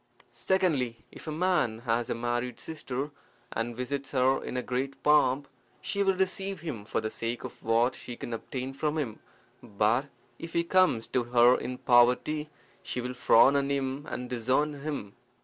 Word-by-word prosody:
Secondly, 150 -12 0
If - - -12
a - - -2
man 155 -9 +1
has 115 -1 0
a - - 0
married 120 +1 -2
sister, 145 -2 -5 0.4
and 115 +1 -3
visits 135 +2 -4
her 130 0 +3
in 125 - -3
great 135 +2 -3
pomp, 145 -2 +4 0.3
she 200 - -2
will 195 -1 +3
receive 190 0 -1
him 130 -11 -5
for - - -1
the 110 - -3
sake 115 +1 -4
of - - -8
what 115 +3 +2
she 120 - -8
can 120 - -6
obtain 130 +3 -5
from 150 +3 -1
him; 120 -8 -3 0.4
but 115 +4 +1 0.3
if 165 - -8
he 170 - +2
comes 180 -10 +3
to 125 -2 0
her 120 +1 +6
in 125 - -4
poverty, 125 +6 +3 0.3
she - - -4
will 125 +1 -3
frown 125 +2 +5
on 140 0 +1
him 140 +1 -2
and 125 - -4
disown 130 +5 +1
him. 140 -9 -4
130 Hz, 170 wpm, -29 LUFS, 120-150 Hz, 0.4 s, her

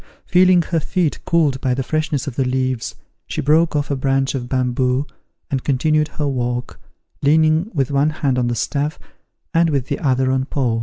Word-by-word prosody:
Feeling 180 -1 +4
her 165 -1 -1
feet 160 0 -1
cooled 150 -6 +2
by 125 -1 +1
the 135 - -2
freshness 155 0 -1
of 140 -5 -5
the 135 - +1
leaves, 130 -1 -1 0.3
she - - -4
broke 155 +3 +3
off 145 0 -1
a - - +1
branch 135 0 0
of 125 -3 -4
bamboo, 130 +1 0 0.5
and 135 -2 -1
continued 150 +3 +1
her 150 - 0
walk, 125 -2 -3 0.4
leaning 155 +5 +3
with 140 -6 -1
one 140 +2 +2
hand 140 -4 0
on 120 - +1
the 120 - -1
staff, 145 +6 -2 0.6
and 165 0 +3
with 140 -4 -1
the - - -2
other 130 -2 +1
on 130 0 0
Paul. 125 -5 -1
140 Hz, 190 wpm, -20 LUFS, 130-155 Hz, 0.6 s, Feeling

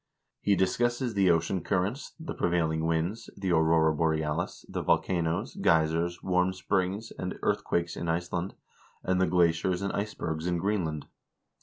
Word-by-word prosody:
He 100 - +2
discusses 120 +6 +1
the 100 -3 +3
ocean 85 +2 +2
currents, 100 +8 -1
the 160 - -5
prevailing 80 -2 0
winds, 85 +8 -1
the 95 -2 -1
aurora 80 -1 +4
borealis, 80 +1 -1
the - - -3
volcanoes, 85 -2 0
geysers, 85 +2 +1
warm 90 0 +2
springs, 95 +3 -1
and - - -4
earthquakes 85 -1 0
in 85 - -3
Iceland, 85 +2 -2 0.5
and 95 0 +1
the 95 - +3
glaciers 90 +2 +2
and 100 - -2
ice 105 +1 -2
bergs 80 0 -3
in 90 -1 +1
Greenland. 85 -6 -1
90 Hz, 145 wpm, -29 LUFS, 80-95 Hz, 0.5 s, aurora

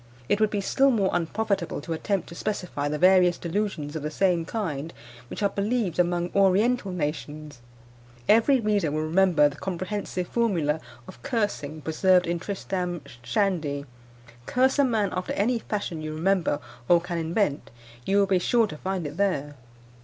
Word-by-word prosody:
It 205 - +1
would 215 - +4
be 205 -1 -1
still 270 +7 +3
more 205 -7 +2
unprofitable 195 +2 -1
to 165 - -4
attempt 195 +3 -2
to - - -9
specify 175 -6 -3
the 150 - -1
various 180 0 +5
delusions 170 -5 -3
of 155 - -3
the 150 - -3
same 175 0 +1
kind 165 -7 -3 0.4
which - - -5
are 200 - +3
believed 200 -3 -1
among 175 0 +1
oriental 200 +3 +3
nations. 150 -3 -4 0.7
Every 230 +5 +5
reader 210 -7 +1
will 155 +1 -1
remember 170 -2 +4
the 145 -1 -7
comprehensive 185 0 -3
formula 170 -10 0 0.3
of 120 - -12
cursing 160 - -2
preserved 180 +4 +3
in 170 0 -1
Tristram 180 -2 -3 0.2
Shandy 145 +1 -1 0.6
curse 260 +3 +2
a - - +6
man 220 -6 +1
after 185 - -3
any 230 +4 +1
fashion 200 -8 -4
you 155 0 -5
remember 175 -2 +1 0.3
or 175 - +7
can 175 0 -4
invent, 165 -2 -1 0.3
you 195 +7 +1
will 200 - +5
be 190 -1 +2
sure 230 +5 +3
to 175 -8 -7
find 185 0 -3
it 145 +2 -6
there. 165 -8 0
180 Hz, 165 wpm, -26 LUFS, 160-205 Hz, 0.7 s, or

